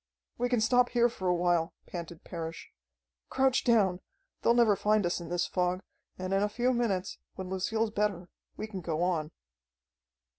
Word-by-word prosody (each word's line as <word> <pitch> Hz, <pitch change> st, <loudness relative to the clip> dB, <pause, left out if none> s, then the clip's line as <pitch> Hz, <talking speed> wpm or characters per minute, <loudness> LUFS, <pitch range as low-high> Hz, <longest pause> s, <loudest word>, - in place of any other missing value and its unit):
"We 245 Hz, +1 st, +1 dB
can 245 Hz, -3 st, +2 dB
stop 245 Hz, +2 st, +4 dB
here 240 Hz, 0 st, +3 dB
for 190 Hz, -5 st, -5 dB
a 180 Hz, -, +3 dB
while," 175 Hz, -1 st, +1 dB
panted 170 Hz, -2 st, -7 dB
Parrish. 165 Hz, -1 st, -6 dB, 0.6 s
"Crouch 265 Hz, -1 st, +2 dB
down! 200 Hz, -7 st, +3 dB, 0.4 s
They'll 235 Hz, -, +4 dB
never 230 Hz, -4 st, +5 dB
find 210 Hz, 0 st, +2 dB
us 175 Hz, 0 st, -1 dB
in 170 Hz, -, -8 dB
this 175 Hz, 0 st, 0 dB
fog, 180 Hz, 0 st, -1 dB, 0.3 s
and 185 Hz, +1 st, -3 dB
in 195 Hz, -, +3 dB
a 210 Hz, -, +1 dB
few 245 Hz, +4 st, +1 dB
minutes, 200 Hz, -6 st, -1 dB, 0.2 s
when 190 Hz, -1 st, -6 dB
Lucille's 220 Hz, +4 st, 0 dB
better, 200 Hz, -4 st, -1 dB, 0.3 s
we -, -, -3 dB
can 200 Hz, -4 st, -6 dB
go 165 Hz, 0 st, -1 dB
on." 165 Hz, -4 st, 0 dB
190 Hz, 175 wpm, -30 LUFS, 175-225 Hz, 0.6 s, never